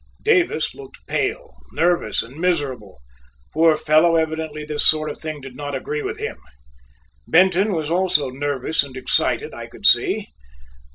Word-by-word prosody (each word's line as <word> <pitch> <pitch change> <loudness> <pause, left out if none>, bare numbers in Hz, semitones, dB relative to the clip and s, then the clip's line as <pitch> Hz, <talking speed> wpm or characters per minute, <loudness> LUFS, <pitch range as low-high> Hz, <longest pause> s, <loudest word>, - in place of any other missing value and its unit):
Davis 390 -6 +2
looked 415 -2 -14
pale, 455 +4 -2 0.2
nervous, 175 +1 +1
and 120 +4 -13
miserable. 140 - -2 0.5
Poor 160 0 +4
fellow, 155 +3 +4
evidently 160 -1 -2
this 150 -1 -1
sort 155 -1 +2
of - - -10
thing 155 -2 -5
did 135 -1 -10
not 145 0 -5
agree 150 +3 -3
with - - -4
him. - - -5 0.9
Benton 190 +4 +4
was 160 -2 -2
also 175 -7 +1
nervous 145 +3 -1
and 135 -2 -8
excited, 130 - 0
I - - -8
could - - -11
see. - - +3
155 Hz, 150 wpm, -21 LUFS, 145-175 Hz, 0.9 s, Poor